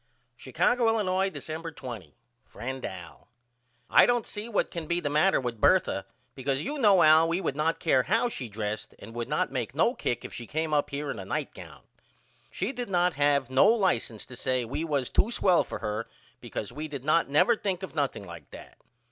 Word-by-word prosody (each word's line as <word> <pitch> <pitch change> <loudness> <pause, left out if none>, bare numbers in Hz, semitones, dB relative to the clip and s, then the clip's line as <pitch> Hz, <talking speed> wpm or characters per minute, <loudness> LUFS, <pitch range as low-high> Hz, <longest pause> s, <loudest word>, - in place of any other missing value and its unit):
Chicago, 245 -1 +1
Illinois, 195 -4 +1
December 160 +1 -6
20. 115 - -9 0.3
FRIEND 130 +2 -6
AL: 90 -3 -9 0.6
I - - +6
don't 240 -1 +1
see 210 +2 -6
what 210 - 0
can 170 -3 -5
be 170 +2 0
the 145 -4 -2
matter 155 +6 +3
with 120 -4 -4
Bertha 100 - +3 0.3
because 135 +1 -2
you 295 - -4
know 205 -7 +5
Al 155 +1 +6
we 170 +2 0
would 160 -7 -2
not 160 +2 0
care 135 -6 +3
how 225 - +1
she 130 - -6
dressed 105 0 -5
and 110 +3 -11
would 120 0 -4
not - - 0
make - - -3
no - - +3
kick - - -3
if - - -8
she 120 - -7
come 155 0 -2
up 145 -1 +2
here 145 +1 -3
in - - -6
a - - -5
nightgown. - - -5 0.7
She - - -3
did 245 -5 -5
not 180 -1 +2
have 140 -3 +1
no 130 - +5
license 185 - +1
to 125 - -11
say 130 0 -1
we 140 +7 -3
was 145 -6 -1
to 220 - +3
swell 185 -7 +3
for - - -6
her 105 +2 -3 0.3
because 105 - -6
we 155 +1 -5
did 140 -3 -7
not 155 0 +3
never 155 +12 +4
think 195 -3 -3
of 190 - -6
nothing 140 -8 -1
like 85 -3 -11
that. - - -13
150 Hz, 205 wpm, -28 LUFS, 130-185 Hz, 0.7 s, I